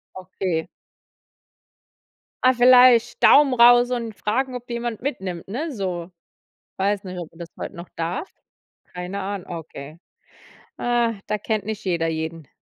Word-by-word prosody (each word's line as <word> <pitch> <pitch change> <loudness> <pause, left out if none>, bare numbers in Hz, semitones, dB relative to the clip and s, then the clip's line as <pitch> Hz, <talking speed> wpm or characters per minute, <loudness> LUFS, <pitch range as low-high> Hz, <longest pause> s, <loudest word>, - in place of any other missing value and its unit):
Okay. 185 -3 -3 1.8
Ah, 255 0 +6
vielleicht 245 -1 +6
Daumen 285 -2 +6
raus 245 0 +6
und 230 -3 -3
fragen, 255 +6 -1
ob 245 -1 -7
dich 240 - -5
jemand 235 -2 -4
mitnimmt, 190 - -4
ne? 295 +10 -3
So. 180 -5 -4 0.7
Weiß 200 +1 0
nicht, 185 -1 -7
ob 170 - -8
man 165 - -20
das 170 - -8
heut - - -5
noch 170 +1 -9
darf? 175 - -4 0.6
Keine 180 +3 -5
Ahn 195 -1 -4
okay. 160 -3 -9 0.8
Ah, 240 -1 +1
da 210 - -1
kennt 215 -1 -2
nicht 215 -1 -5
jeder 170 -3 0
jeden. 160 -1 -4
200 Hz, 145 wpm, -23 LUFS, 175-240 Hz, 1.8 s, Ah